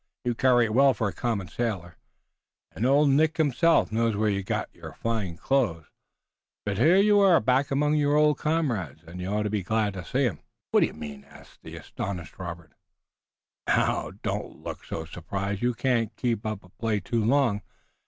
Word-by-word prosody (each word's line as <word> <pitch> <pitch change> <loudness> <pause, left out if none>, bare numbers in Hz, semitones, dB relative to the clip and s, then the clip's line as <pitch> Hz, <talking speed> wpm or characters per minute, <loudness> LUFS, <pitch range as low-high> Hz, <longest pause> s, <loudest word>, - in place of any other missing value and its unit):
You 120 - +1
carry 120 0 +4
it 110 - -3
well 135 +2 +5
for 110 - -1
a - - -8
common 110 -7 -2
sailor, 95 -8 -3 0.8
and 120 - -1
old 140 +2 +4
Nick 155 +3 +3
himself 160 0 +3
knows 115 0 +1
where 105 0 +1
you 100 0 -1
got 95 - -3
your - - -10
fine 105 -7 -3
clothes, 105 - 0 0.8
but 100 -2 -2
here 170 +4 +5
you 205 +1 +5
are 190 -4 +6
back 130 +4 +1
among 150 +2 +1
your 145 -1 +2
old 150 -1 +3
comrades, 120 - -1
and 85 +2 -9
you 90 - -4
ought 105 +2 0
to 105 - -2
be 105 -2 0
glad 105 +2 0
to 95 -2 -6
see - - 0
'em." - - -2 0.3
"What - - +5
do - - +4
you - - -11
mean?" 75 -2 -8
asked - - -17
the - - -10
astonished 90 -4 -6
Robert. 85 -3 -7 0.9
"Now, - - +1
don't - - -4
look - - -6
so 80 - -5
surprised. 100 +4 -4
You 120 0 +1
can 120 -3 +1
keep 115 -3 -1
up 105 -2 -4
a 90 - -17
play 110 +2 -2
too 110 +4 -1
long. 120 -3 +2
110 Hz, 195 wpm, -26 LUFS, 95-135 Hz, 0.9 s, are